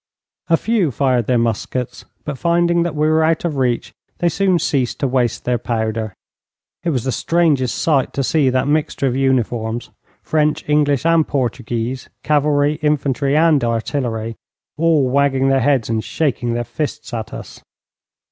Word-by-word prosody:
A 165 - +5
few 220 -6 +1
fired 130 -3 0
their 125 - +2
muskets, 115 +2 -2 0.2
but 150 - -3
finding 170 0 +2
that 170 -2 -2
we 150 +1 +1
were 160 0 +3
out 160 +1 +1
of 155 -4 -2
reach 125 -3 -1 0.2
they 175 - +1
soon 185 +2 +2
ceased 135 -6 -1
to 140 - +2
waste 125 -3 0
their 125 -1 0
powder. 110 -3 -2 0.7
It 175 - 0
was 130 -7 -1
the 130 - -1
strangest 150 -5 +1
sight 140 -5 +1
to 140 - -1
see 140 0 +2
that 130 +1 0
mixture 150 -1 0
of 125 -2 0
uniforms, 120 -3 -1 0.3
French, 155 0 0
English, 145 -1 +2
and 165 -2 +3
Portuguese, 120 -1 -3
cavalry, 150 0 +2
infantry, 140 -1 +1
and 155 -4 +4
artillery, 115 -1 -2 0.4
all 155 -4 +2
wagging 135 0 +2
their 135 0 +3
heads 130 -2 +2
and 110 -1 -1
shaking 125 -6 -1
their 120 - -1
fists 145 0 -5
at 110 -2 -4
us. - - -9
135 Hz, 160 wpm, -19 LUFS, 120-155 Hz, 0.7 s, A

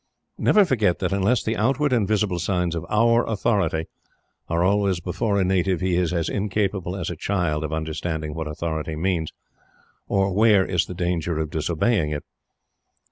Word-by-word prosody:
Never 210 -2 +5
forget 110 - +1
that - - -1
unless 100 +5 +2
the 110 - -1
outward 135 +5 +1
and 110 -5 +2
visible 105 -4 0
signs 90 -1 0
of 85 - -5
Our 115 +2 +3
Authority 100 -7 0 0.6
are 85 +1 +1
always 100 -1 +2
before 100 +4 -1
a - - +3
native 95 -1 +1
he 95 0 0
is 90 -1 +1
as 85 -2 -1
incapable 100 -3 -1
as 90 -3 -3
a - - -5
child 85 -4 -1
of 75 - -4
understanding 80 0 -3
what 80 0 -4
authority 80 0 -3
means, 85 -1 -1 0.8
or 95 -1 +1
where 105 -2 +4
is 90 -2 0
the 90 - -7
danger 85 -2 -1
of 80 -1 -2
disobeying 80 +3 0
it. 75 -1 -4
90 Hz, 170 wpm, -23 LUFS, 80-105 Hz, 0.8 s, Never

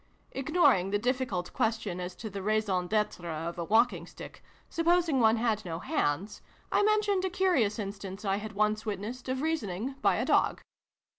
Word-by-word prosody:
Ignoring 270 - +3
the 205 - +1
difficult 240 -6 -2
question 220 -5 -1
as 180 0 -5
to 220 - -7
the 195 0 -5
raison 200 -3 0
dtre 175 -7 -1
of 170 +1 -5
a - - -1
walking 205 -3 +2
stick, - - -11 0.2
supposing 335 -3 +2
one 225 -1 +5
had 220 -2 0
no 165 -4 -4
hands, 190 - -1 0.3
I - - +3
mentioned 415 -2 +2
a 380 - 0
curious 355 - +2
instance, 200 -1 -6
I 195 0 +1
had 215 +1 -6
once 215 +1 +1
witnessed, 220 +5 -5
of 260 +2 -1
reasoning 250 - -2
by - - +3
a - - -1
dog. - - +2
215 Hz, 170 wpm, -29 LUFS, 190-260 Hz, 0.3 s, one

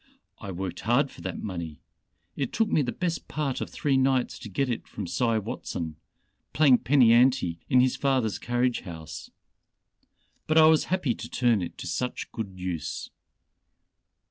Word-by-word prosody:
I 100 - -7
worked 90 -1 -5
hard 125 +5 +2
for - - -13
that - - -5
money. 85 -6 -5 0.6
It 135 -4 -2
took 225 -1 +1
me 155 - +3
the 125 -3 -1
best 175 +2 -3
part 145 -4 -2
of - - -3
three 140 -2 0
nights 130 -1 +1
to 110 - -8
get 135 +8 0
it 120 -2 -3
from 105 - -6
Cy 115 +5 +1
Watson 85 -6 -4 0.6
playing 140 -5 +5
penny 125 -4 +5
ante 120 -9 +3
in 125 - +5
his 130 0 +2
father's 130 -6 +1
carriage 120 0 0
house. 80 -5 -8 1.2
But 155 - +2
I 160 - +8
was 160 -1 +5
happy 180 -9 0
to 115 +1 -8
turn 120 -5 +2
it 85 - -6
to - - -7
such 125 0 -3
good 110 -4 -4
use." 90 -4 -4
120 Hz, 170 wpm, -27 LUFS, 100-135 Hz, 1.2 s, I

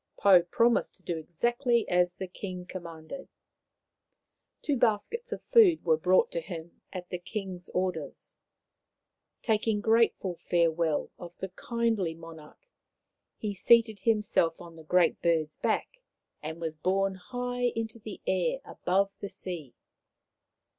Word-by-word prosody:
Pou 190 -3 +7
promised 230 +7 +2
to 190 - -24
do 175 - -2
exactly 235 - 0
as 180 0 +2
the 190 - -5
king 180 -1 -7
com 185 -1 -7
manded. 165 +10 -9 1.4
Two 290 - +1
baskets 240 - 0
of - - -5
food 385 - +6
were 160 -2 +5
brought 180 +4 +3
to 170 - -2
him 170 -1 -9
at 180 -2 -7
the 180 - -4
king's 185 -1 -5
orders. 180 -6 -3 1.1
Taking 220 -1 +1
grateful 225 -4 +2 0.2
fare 170 -1 +4
well 160 -2 -1
of 175 0 -10
the 190 - -5
kindly 220 -4 -1
monarch, 165 - -13 0.7
he 210 -2 -3
seated 220 +1 +4
himself 205 -6 +1
on 170 -1 -11
the 160 - -12
Great 175 +2 +2
Bird's 160 -3 +1
back - - -1 0.4
and 160 +2 -6
was 160 -2 -3
borne 190 +5 +1
high 245 +5 -3
into 225 0 -4
the 215 -2 -9
air 185 +7 +1
above 195 +2 0
the 200 - -5
sea. 175 -8 -6
185 Hz, 140 wpm, -29 LUFS, 170-225 Hz, 1.4 s, Pou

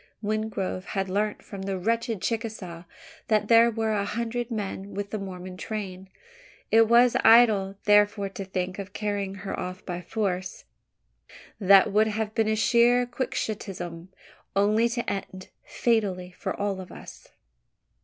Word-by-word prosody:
Wingrove 210 -3 -2
had 195 -1 -3
learnt 210 +2 -1
from 200 -2 -8
the 190 0 -3
wretched 225 +1 -1
Chicasaw 210 -7 -4 0.4
that 215 -1 +1
there 230 0 +7
were 225 -1 -1
a 205 -1 0
hundred 235 +3 -3
men 200 -3 -5
with 200 0 -4
the 215 - -3
Mormon 185 -1 -7
train. 190 -3 -6 0.6
It 225 0 +6
was 235 +1 +5
idle, 215 -4 +6
therefore, 205 -1 +4
to 195 0 -6
think 185 0 -4
of 195 0 -7
carrying 205 -2 -2
her 195 - -3
off 185 +1 -6
by 175 -1 -4
force. 185 -2 -3 1.0
That 195 0 +6
would 215 +1 +4
have 215 0 -2
been 220 -1 +1
sheer 240 +2 +4
quixotism 195 -8 -4 0.5
only 215 +4 +3
to 235 0 -3
end 190 -1 -5 0.2
fatally 195 -6 0
for 180 - -5
all 200 -2 -1
of 185 - -11
us. - - -12
205 Hz, 145 wpm, -26 LUFS, 190-225 Hz, 1.0 s, there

